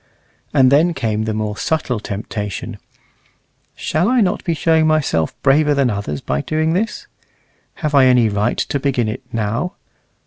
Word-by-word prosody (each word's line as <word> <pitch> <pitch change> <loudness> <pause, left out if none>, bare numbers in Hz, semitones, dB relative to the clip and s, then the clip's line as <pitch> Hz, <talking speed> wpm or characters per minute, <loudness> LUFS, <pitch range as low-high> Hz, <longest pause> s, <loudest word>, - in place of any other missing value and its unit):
And 130 -1 +4
then 165 +4 +3
came 110 -4 -1
the 110 - -2
more 105 -1 -2
subtle 125 +2 -1
temptation, 105 -2 -5 1.0
"Shall 175 +7 0
I 255 0 +3
not 200 -2 +1
be 170 -3 -1
showing 160 0 +2
myself 140 - 0
braver 145 +2 +4
than 135 -3 +2
others 100 -9 -4
by 70 +1 -2
doing 155 +1 0
this? 215 +6 -2 0.8
Have 150 - -1
I 140 -2 +6
any 125 -3 +4
right 105 +2 0
to 140 - -1
begin 130 -4 0
it 110 - -4
now? 115 - -2
130 Hz, 160 wpm, -18 LUFS, 105-155 Hz, 1.0 s, I